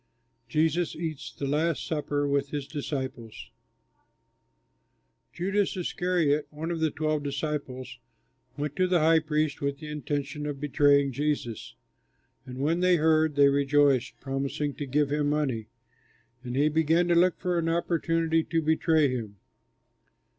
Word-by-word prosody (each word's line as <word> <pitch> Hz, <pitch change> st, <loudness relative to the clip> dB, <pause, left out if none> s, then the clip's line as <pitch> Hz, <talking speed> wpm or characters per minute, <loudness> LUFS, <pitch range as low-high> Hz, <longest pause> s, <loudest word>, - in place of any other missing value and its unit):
JESUS 160 Hz, +4 st, +1 dB
EATS 160 Hz, -3 st, -5 dB
THE 140 Hz, -, -5 dB
LAST 155 Hz, +3 st, 0 dB
SUPPER 145 Hz, -2 st, -1 dB
WITH 140 Hz, 0 st, 0 dB
HIS 145 Hz, -2 st, -4 dB
DISCIPLES 130 Hz, -6 st, -5 dB, 1.8 s
Judas 195 Hz, +3 st, -1 dB
Iscariot, 175 Hz, -4 st, 0 dB
one 160 Hz, +3 st, -5 dB
of 170 Hz, -, -2 dB
the 160 Hz, 0 st, +2 dB
twelve 155 Hz, 0 st, -1 dB
disciples, 140 Hz, -3 st, -4 dB, 0.6 s
went 145 Hz, 0 st, -3 dB
to 185 Hz, -1 st, +3 dB
the 180 Hz, -3 st, +2 dB
high 160 Hz, +1 st, +5 dB
priests 155 Hz, -2 st, -1 dB
with 140 Hz, 0 st, -1 dB
the 150 Hz, +1 st, -9 dB
intention 145 Hz, 0 st, -3 dB
of 145 Hz, -2 st, -4 dB
betraying 140 Hz, -1 st, +3 dB
Jesus. 140 Hz, -4 st, -3 dB, 0.7 s
And 125 Hz, 0 st, -8 dB
when 155 Hz, +6 st, 0 dB
they 180 Hz, 0 st, +4 dB
heard, 155 Hz, -1 st, +3 dB
they 140 Hz, -1 st, +6 dB
rejoiced, 140 Hz, -3 st, +2 dB
promising 140 Hz, +2 st, -3 dB
to 145 Hz, -, -4 dB
give 145 Hz, +2 st, +1 dB
him 145 Hz, 0 st, +1 dB
money; 135 Hz, -7 st, -1 dB, 0.8 s
and 125 Hz, 0 st, -5 dB
he 145 Hz, +3 st, +3 dB
began 160 Hz, +3 st, +2 dB
to -, -, +4 dB
look 175 Hz, +1 st, +4 dB
for 180 Hz, -2 st, 0 dB
an 165 Hz, 0 st, -1 dB
opportunity 165 Hz, -1 st, +1 dB
to 165 Hz, 0 st, 0 dB
betray 160 Hz, -1 st, +3 dB
him. 115 Hz, -6 st, -4 dB
150 Hz, 140 wpm, -27 LUFS, 140-160 Hz, 1.8 s, they